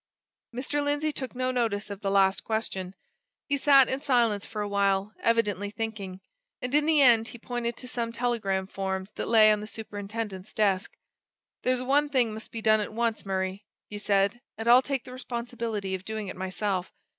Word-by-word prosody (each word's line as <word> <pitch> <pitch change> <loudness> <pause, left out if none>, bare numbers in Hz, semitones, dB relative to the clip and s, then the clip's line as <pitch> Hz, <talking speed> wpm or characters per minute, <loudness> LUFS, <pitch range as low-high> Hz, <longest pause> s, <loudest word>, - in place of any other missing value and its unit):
Mr. 270 +4 -2
Lindsey 290 +2 0
took 260 -3 -6
no 255 0 0
notice 220 -5 -1
of 200 0 -7
the 195 - -1
last 195 -1 +3
question. 195 -4 -3 0.5
He 285 - +1
sat 275 -2 +6
in 265 +1 -2
silence 235 -7 +2
for 215 -2 -3
a - - -3
while, 200 0 +1
evidently 210 -4 +1
thinking. 205 -4 -5 0.4
And 250 +1 -4
in 295 +1 +3
the 310 -3 +5
end 230 -3 +6
he 240 - -9
pointed 240 0 -3
to 250 - -9
some 235 -2 -2
telegram 230 -6 -1
forms 190 0 -4
that - - -4
lay 220 -2 +7
on 210 -1 +1
the 210 - -6
superintendent's 205 -2 -6
desk. 200 -1 +1 0.7
"There's 255 0 +1
one 290 +3 +2
thing 250 -6 +2
must 220 +1 -9
be 225 -1 -6
done 215 -1 +5
at 210 - -4
once, 230 -2 -1
Murray," 190 +1 -2 0.3
he 205 - -5
said; 200 +3 +1 0.2
"and 225 +1 -4
I'll 245 +2 +8
take 270 -2 -2
the 255 -1 -10
responsibility 235 -5 -4
of 190 -1 -3
doing 215 -1 -4
it - - -6
myself. 190 0 -2
220 Hz, 190 wpm, -28 LUFS, 200-245 Hz, 0.7 s, I'll